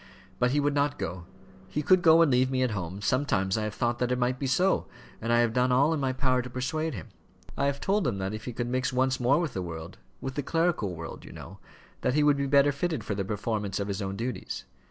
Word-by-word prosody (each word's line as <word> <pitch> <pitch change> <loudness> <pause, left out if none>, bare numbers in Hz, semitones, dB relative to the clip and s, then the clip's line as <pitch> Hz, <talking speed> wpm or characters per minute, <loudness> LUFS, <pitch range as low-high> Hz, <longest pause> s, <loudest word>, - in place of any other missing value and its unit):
But 125 - +3
he 145 +3 +1
would 145 0 +1
not 145 0 +1
go. 85 +1 -5 0.4
He 150 +11 -3
could 185 +3 +5
go 165 0 +7
and 155 - +2
leave 130 +1 +3
me 130 -1 +1
at 125 - +1
home. 95 -1 -4
Sometimes 95 -5 +1
I 110 -1 -1
have 105 - -4
thought 120 0 0
that 125 0 0
it 125 - +1
might 125 +1 0
be 135 - -1
so, 180 +9 +2 0.3
and 115 +1 -1
I 120 0 +5
have 115 -2 +1
done 125 +1 +2
all 140 +6 +4
in 160 - -1
my 135 -2 0
power 130 -1 +1
to 125 - -8
persuade 140 +4 -2
him. 90 - -8 0.5
I 140 - +1
have 140 0 -1
told 195 -2 +1
him 110 -5 -1
that 95 +1 -3
if 110 0 -6
he 125 - -4
could 120 - -2
mix 130 +2 -1
once 130 +1 +1
more 130 +5 +3
with 165 -7 -2
the 95 - -3
world, 80 -2 -7 0.2
with 130 - -5
the 145 - -2
clerical 165 - 0
world, 85 0 -8
you - - -11
know, 95 +3 -10 0.4
that 125 - +1
he 150 - +4
would 145 -1 +4
be 140 0 -1
better 140 +1 +5
fitted 155 +3 -2
for 105 - -3
the 100 -1 -2
performance 105 0 -2
of 100 0 -3
his 100 +1 -3
own 95 0 -3
duties. 120 +5 -4
125 Hz, 265 wpm, -28 LUFS, 105-140 Hz, 0.5 s, go